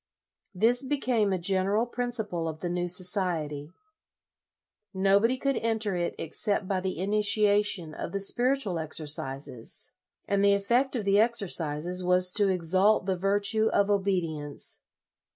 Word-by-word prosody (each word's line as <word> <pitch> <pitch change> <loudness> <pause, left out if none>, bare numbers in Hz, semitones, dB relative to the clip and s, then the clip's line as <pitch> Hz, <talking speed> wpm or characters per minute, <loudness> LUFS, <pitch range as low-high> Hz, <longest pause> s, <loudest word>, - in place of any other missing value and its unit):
This 235 +7 +3
became 255 -7 0
a 190 - +1
general 195 +5 +1
principle 230 -8 -3
of 155 0 -6
the 175 - -3
new 175 0 -2
society. 175 -5 -2 1.3
Nobody 200 +6 +3
could 275 +1 -1
enter 220 -3 0
it 175 -1 -2
ex 160 - -4
cept 200 -2 -1
by 190 -1 0
the 185 -2 -4
initiation 205 -2 +2
of - - -6
the 200 - -2
Spiritual 240 -2 +1
Ex 160 -1 -5
ercises, 135 -5 -3 0.4
and 200 0 +1
the 200 0 +5
effect 240 +7 0
of 220 -5 -3
the 200 +1 +3
exercises 180 -6 0
was 180 0 +3
to 205 -3 +4
exalt 185 +3 +2
the 190 -1 0
virtue 205 +4 +1
of 200 -1 +1
obedience. 170 -7 -2
195 Hz, 140 wpm, -27 LUFS, 175-215 Hz, 1.3 s, the